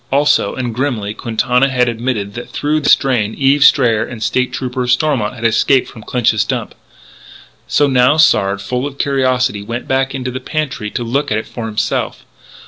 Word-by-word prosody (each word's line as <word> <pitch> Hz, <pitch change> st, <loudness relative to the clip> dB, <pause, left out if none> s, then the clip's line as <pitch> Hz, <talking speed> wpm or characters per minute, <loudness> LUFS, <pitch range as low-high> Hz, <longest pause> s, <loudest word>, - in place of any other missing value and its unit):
Also, 145 Hz, +2 st, +2 dB
and 125 Hz, -3 st, -3 dB
grimly, 115 Hz, -5 st, -2 dB
Quintana 125 Hz, +4 st, 0 dB
had 125 Hz, -1 st, +1 dB
admitted 115 Hz, -4 st, -3 dB
that 120 Hz, +2 st, -8 dB
through 150 Hz, +1 st, -1 dB
this 145 Hz, -, +5 dB
drain 120 Hz, -6 st, -1 dB
Eve 140 Hz, +1 st, +3 dB
Strayer 120 Hz, -7 st, +4 dB
and 120 Hz, -, -8 dB
the 110 Hz, -, -2 dB
State 125 Hz, 0 st, 0 dB
Trooper, 125 Hz, -1 st, -3 dB
Stormont, 125 Hz, -3 st, +1 dB
had 115 Hz, -2 st, -6 dB
escaped 125 Hz, +3 st, +3 dB
from 110 Hz, -, -12 dB
Clinch's 110 Hz, -2 st, +1 dB
Dump. -, -, -4 dB, 0.9 s
So 145 Hz, -, +2 dB
now 130 Hz, +2 st, +3 dB
Sard, 100 Hz, -10 st, +3 dB
full 125 Hz, +6 st, -2 dB
of 140 Hz, -1 st, -10 dB
curiosity, 130 Hz, -6 st, 0 dB
went 115 Hz, +4 st, -6 dB
back 135 Hz, +1 st, 0 dB
into 130 Hz, -1 st, -4 dB
the 130 Hz, -, -5 dB
pantry 135 Hz, -6 st, -3 dB
to 120 Hz, -, -4 dB
look 130 Hz, +4 st, -1 dB
at 105 Hz, -, +1 dB
it 110 Hz, -, -4 dB
for 115 Hz, -2 st, -6 dB
himself. 110 Hz, -1 st, -2 dB
125 Hz, 185 wpm, -16 LUFS, 115-135 Hz, 0.9 s, this